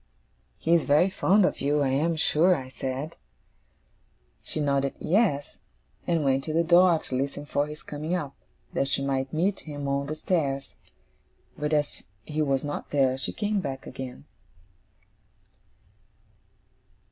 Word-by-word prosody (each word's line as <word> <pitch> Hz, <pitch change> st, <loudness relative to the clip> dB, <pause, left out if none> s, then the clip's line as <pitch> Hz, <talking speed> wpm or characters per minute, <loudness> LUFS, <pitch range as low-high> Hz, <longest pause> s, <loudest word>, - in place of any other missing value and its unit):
'He 165 Hz, -, +1 dB
is 170 Hz, -, +4 dB
very 155 Hz, +6 st, +4 dB
fond 195 Hz, +1 st, +4 dB
of -, -, -1 dB
you, 145 Hz, +1 st, +2 dB
I 135 Hz, -, +2 dB
am 155 Hz, +5 st, +1 dB
sure,' 165 Hz, +3 st, +3 dB
I 130 Hz, -4 st, -6 dB
said. 135 Hz, +4 st, -4 dB, 1.2 s
She -, -, -4 dB
nodded 140 Hz, -2 st, +1 dB
'Yes,' 175 Hz, -7 st, +1 dB, 0.5 s
and 165 Hz, -3 st, +2 dB
went 135 Hz, 0 st, +2 dB
to 155 Hz, -, -3 dB
the 165 Hz, +1 st, +3 dB
door 175 Hz, 0 st, +6 dB
to 145 Hz, -, -7 dB
listen 140 Hz, +2 st, -2 dB
for 145 Hz, 0 st, 0 dB
his 150 Hz, 0 st, -9 dB
coming 155 Hz, +4 st, -3 dB
up, 145 Hz, -6 st, -4 dB, 0.4 s
that 135 Hz, -, +1 dB
she 140 Hz, -, 0 dB
might 135 Hz, -1 st, -1 dB
meet 185 Hz, +5 st, +1 dB
him 145 Hz, -2 st, -6 dB
on 140 Hz, 0 st, 0 dB
the 155 Hz, -, -3 dB
stairs. 145 Hz, -5 st, -1 dB, 0.8 s
But, 150 Hz, +1 st, -2 dB
as 150 Hz, -1 st, -1 dB, 0.2 s
he 155 Hz, 0 st, -2 dB
was 135 Hz, -3 st, +1 dB
not 145 Hz, 0 st, -4 dB
there, 135 Hz, -3 st, +2 dB
she 130 Hz, -, -3 dB
came 210 Hz, -1 st, -1 dB
back 135 Hz, -3 st, -5 dB
again. 130 Hz, -1 st, -8 dB
145 Hz, 150 wpm, -27 LUFS, 135-165 Hz, 1.2 s, door